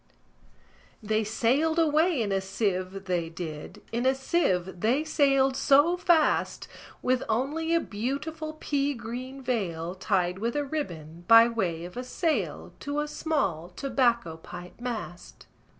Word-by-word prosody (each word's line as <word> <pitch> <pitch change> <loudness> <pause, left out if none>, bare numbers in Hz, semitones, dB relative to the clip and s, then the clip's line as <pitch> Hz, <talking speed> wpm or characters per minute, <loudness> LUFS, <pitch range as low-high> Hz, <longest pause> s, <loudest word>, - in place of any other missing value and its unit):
II. - - -11
They 220 0 +2
sailed 255 +9 +1
away 315 -3 +3
in 205 - -2
a 195 0 +1
sieve, 190 -1 -2
they 175 -3 -1
did, 165 -3 -7
In 240 +3 0
a 265 - +4
sieve 190 - 0
they 245 - +2
sailed 275 -3 +3
so 290 +6 +4
fast, 345 -3 +2 0.4
With 255 0 +2
only 300 +9 0
a - - +4
beautiful 310 +8 -4
pea 285 -1 0
green 250 +4 -7
veil 180 -9 -2
Tied 185 -1 0
with 235 +4 -2
a 290 -1 0
ribbon, 175 - -5
by 230 0 +9
way 180 -8 -2
of 180 +6 -10
a 250 - -3
sail, 250 - -2
To 290 +1 -3
a 300 - -1
small 200 - -1
tobacco 235 -5 0
pipe 175 +4 -10
mast. 220 -8 -6
235 Hz, 145 wpm, -27 LUFS, 185-285 Hz, 0.4 s, by